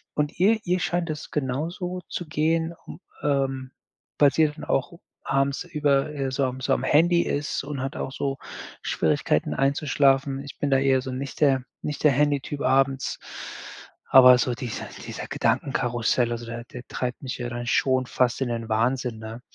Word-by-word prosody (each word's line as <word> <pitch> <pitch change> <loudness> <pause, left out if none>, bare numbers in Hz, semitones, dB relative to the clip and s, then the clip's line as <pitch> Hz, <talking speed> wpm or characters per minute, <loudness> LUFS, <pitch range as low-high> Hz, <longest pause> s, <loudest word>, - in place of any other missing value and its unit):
Und 150 0 -1
ihr 215 +5 +4
ihr 180 0 +1
scheint 175 -2 -1
das 155 -1 -5
genauso 165 +7 -3
zu 175 - -5
gehen, 160 +2 0 0.5
ähm, 135 -2 0 0.5
weil 145 -2 +6
sie 160 -1 +4
dann 150 +1 -9
auch 135 - 0 0.3
abends 135 +2 +1
über 150 -4 +1
äh, 135 -2 -2
so 135 +1 +1
am 130 0 -4
so 135 - -1
am - - 0
Handy 170 +3 +4
ist 145 -1 -2
und 140 -1 -5
hat 135 - -4
auch - - -3
so 135 0 -2 0.5
Schwierigkeiten - - +1
einzuschlafen. 135 -1 +2
Ich 140 - -11
bin 145 - 0
da 135 - +5
eher 135 -1 +3
so 130 0 -5
nicht 135 +3 -6
der 135 -3 +4 0.2
nicht 150 - -4
der 150 - +6
Handytyp 145 0 0
abends. 135 0 +1 0.9
Aber 125 -1 +9
so 125 +1 0
dieser 120 -2 -5 0.2
dieser - - -5
Gedankenkarussell, 120 -3 0
also 120 0 -4
der 115 +1 -6
der 125 0 -10
treibt 125 -1 -4
mich 130 -1 -4
ja 120 0 -3
dann 120 0 -5
schon 130 +1 +2
fast 120 -2 +1
in 130 - 0
den 115 -1 -3
Wahnsinn, 120 +2 0
ne? 110 +2 -8
135 Hz, 175 wpm, -25 LUFS, 125-150 Hz, 0.9 s, Aber